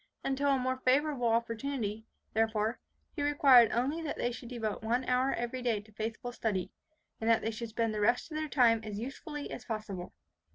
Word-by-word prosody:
Until 275 +1 +1
a 275 - +4
more 260 0 -1
favourable 260 0 +2
opportunity, 230 -1 -1 0.3
therefore, 220 0 +1 0.4
he 290 - -3
required 275 -5 +6
only 275 +8 0
that 310 -3 -4
they 240 - 0
should 240 0 -8
devote 225 -4 -3
one 240 +3 0
hour 255 +2 +2
every 240 +2 -3
day 235 -4 +1
to 210 +1 -16
faithful 225 +3 -4
study, 210 -6 -2 0.5
and 225 - 0
that 230 - +4
they 225 - 0
should 225 +1 -5
spend 225 0 0
the 210 - -2
rest 245 +8 +2
of - - -5
their 310 -1 -2
time 230 -5 +4
as 210 -1 -5
usefully 285 - -6
as - - -6
possible. 215 -6 -5
235 Hz, 195 wpm, -31 LUFS, 220-265 Hz, 0.5 s, required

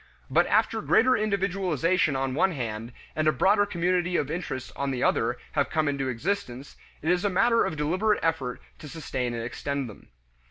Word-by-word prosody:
But - - +4
after - - +2
greater 255 +3 +4
individualization 185 - +1
on 135 -1 -1
one 185 +6 +2
hand, 115 -4 -4 0.2
and 155 0 +1
a - - +6
broader 200 +8 +3
community 180 -1 0
of 145 0 -1
interest 130 -8 -4
on 140 0 -2
the 130 -2 -2
other - - +1
have - - 0
come 155 -1 0
into 140 -2 -1
existence, 135 -1 -3 0.3
it 160 - +2
is 180 +2 +1
a 205 - +2
matter 230 +5 +3
of 155 - -3
deliberate 185 +8 +1
effort 140 -7 -1 0.2
to 150 - -9
sustain 130 -6 -3
and 115 - -3
extend 140 +3 -3
them. 105 - -13
155 Hz, 185 wpm, -27 LUFS, 130-185 Hz, 0.3 s, a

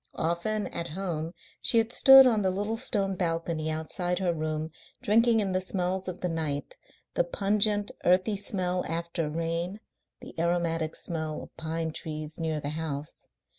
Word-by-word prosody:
Often 170 +6 -1
at 170 0 -3
home 165 -4 -2 0.3
she - - +5
had 225 0 +3
stood 270 0 +9
on 225 -4 +3
the 190 - +2
little 205 +4 -2
stone 200 -5 0
balcony 165 -2 -1
outside 175 +3 -1
her 180 -2 0
room, 155 0 -3 0.3
drinking 225 +1 +4
in 195 -2 -1
the 185 0 0
smells 185 0 -1
of 185 0 -5
the 180 - 0
night 155 -4 -2 0.4
the - - +2
pungent, 205 +3 +1
earthy 185 +4 +3
smell 185 -2 -1
after 165 -1 -2
rain, 165 +5 -2 0.4
the - - -11
aromatic 165 -2 0
smell 155 -2 -4
of - - -14
pine 160 0 -3
trees 155 0 -5
near 160 -2 -1
the 145 - -4
house. 150 -2 -5
170 Hz, 160 wpm, -28 LUFS, 160-195 Hz, 0.4 s, stood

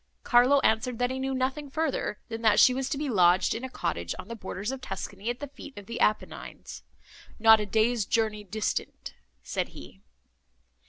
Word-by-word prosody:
Carlo 255 +3 +5
answered, 235 +1 +1
that 245 +1 0
he 260 - -3
knew 265 0 -2
nothing 265 +3 -2
further, 310 -6 -2
than 225 0 -6
that 220 -2 +4
she 255 - +7
was 265 +1 -2
to 280 - -2
be 295 +1 -2
lodged 180 -6 +4
in 230 - -5
a 260 - -4
cottage 85 - -3
on - - -9
the 230 - -5
borders 200 +1 -5
of 270 -1 -6
Tuscany, 200 -1 -5
at 240 +1 -3
the 290 - -5
feet 280 -1 -12
of 205 - -9
the 230 +3 -6
Apennines—"Not 220 +1 0
a 210 - -3
day's 220 +2 +2
journey 215 -2 0
distant," 210 +1 -4 0.3
said - - -2
he. - - -12
230 Hz, 190 wpm, -28 LUFS, 210-260 Hz, 0.3 s, she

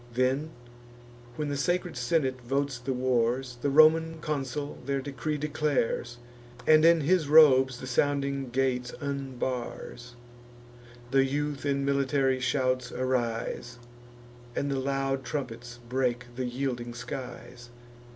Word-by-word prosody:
Then, 130 +5 +1 0.9
when 150 +1 -3
the 145 - -2
sacred 175 +4 -1
senate 135 -7 0
votes 135 +1 -1
the 125 +2 -3
wars, 125 0 0
The 145 - +1
Roman 160 +2 +5
consul 145 -1 -3
their 140 +1 -1
decree 145 +3 -3
declares, 145 -5 -1 0.5
And 155 0 +6
in 165 0 +6
his 160 +1 +2
robes 130 -4 +6
the - - -7
sounding 140 +1 0
gates 125 -1 0
unbars. 130 -3 -5 1.0
The 135 0 +5
youth 145 +1 -2
in 140 -1 0
military 140 -1 +1
shouts 130 -1 0
arise, 120 -1 -2 0.8
And 140 - -1
the 135 - 0
loud 135 0 -1
trumpets 120 -4 -5
break 125 -1 0
the 130 0 -2
yielding 120 -1 -3
skies. 120 -1 -8
135 Hz, 120 wpm, -28 LUFS, 125-145 Hz, 1.0 s, And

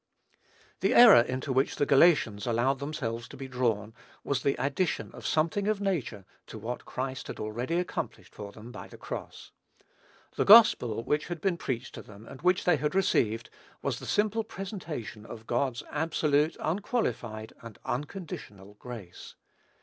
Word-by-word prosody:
The - - +2
error 235 - +10
into 130 +3 -3
which 130 +2 +1
the 145 - +1
Galatians 135 -9 +4
allowed 120 +3 +1
themselves 120 -5 -4
to - - -12
be 135 0 -6
drawn, 115 -4 -1 0.3
was 135 -3 -1
the 140 - +1
addition 140 +7 -1
of - - -7
something 165 +6 +1
of 215 -1 +1
nature 160 - -2 0.2
to - - -9
what 115 +3 -5
Christ 130 0 -4
had - - -7
already 120 +10 -2
accomplished 180 - -4
for 100 -1 -8
them 110 +3 -11
by - - -9
the - - -13
cross. - - -8 0.9
The - - +3
gospel 160 - +7
which 150 +4 0
had 175 -1 -4
been 190 0 +1
preached 130 -8 -4
to - - -7
them 105 +1 -14
and 135 +2 -11
which 180 +1 +3
they 175 -3 +4
had 150 +4 -2
received, 115 - +1 0.3
was - - -1
the - - -9
simple 215 +2 +1
presentation 170 - -7
of 115 0 -10
God's 120 0 -1
absolute, 155 -1 +1
unqualified, 155 - -2
and 115 -3 -11
unconditional, 145 - -6
grace. 110 -8 -10
135 Hz, 160 wpm, -29 LUFS, 115-170 Hz, 0.9 s, error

